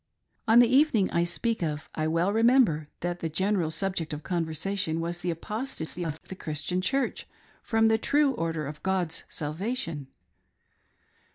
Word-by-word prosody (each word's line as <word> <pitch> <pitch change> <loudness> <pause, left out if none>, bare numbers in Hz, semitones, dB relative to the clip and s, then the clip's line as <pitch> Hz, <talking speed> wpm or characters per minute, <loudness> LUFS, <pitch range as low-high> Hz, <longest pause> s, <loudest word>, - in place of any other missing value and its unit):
On 225 +1 +6
the 240 0 +8
evening 255 -6 +4
I 170 - +2
speak 225 +6 -1
of, 150 -2 -2
I 155 0 -1
well 165 +5 +1
remember 225 - +4
that 175 0 -2
the 165 - -2
general 190 0 +1
subject 165 -1 -2
of 150 0 -5
conversation 165 0 -1
was 170 +1 -3
the 175 - -2
apostasy 180 -1 -4
of 160 -1 -4
the - - -8
Christian 160 +2 -2
Church 270 +6 -1 0.3
from 225 0 +2
the 220 0 +3
true 290 +3 +3
order 165 - -2
of 150 +2 -7
God's 185 -4 -1
salvation. 160 - -3
175 Hz, 155 wpm, -28 LUFS, 160-220 Hz, 0.3 s, the